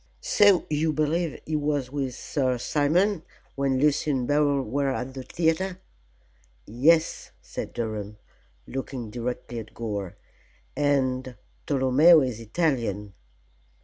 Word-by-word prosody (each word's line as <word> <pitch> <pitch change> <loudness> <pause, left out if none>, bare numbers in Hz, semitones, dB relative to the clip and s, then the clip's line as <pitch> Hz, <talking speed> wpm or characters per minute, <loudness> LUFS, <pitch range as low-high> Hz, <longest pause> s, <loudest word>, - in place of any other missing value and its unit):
"So 205 - +4
you 155 +1 +1
believe 155 +2 0
he 155 - -2
was 145 -3 -1
with 135 -3 -3
Sir 130 -4 -1
Simon 160 - +1 0.3
when 135 -1 0
Lucy 150 +1 +2
and 130 -4 0
Beryl 145 -2 +2
were 135 +4 -1
at 130 0 -3
the 130 - -6
theatre?" 170 +6 -1 0.9
"Yes," 155 +9 +2
said - - -6
Durham, 105 -3 -4 0.5
looking 130 -4 -5
directly 120 0 -4
at 110 -1 -11
Gore, 105 -5 -4 0.6
"and 130 -3 0 0.3
Tolomeo 145 +4 +6
is 125 -4 -2
Italian." 115 - -1
135 Hz, 115 wpm, -26 LUFS, 125-155 Hz, 0.9 s, Tolomeo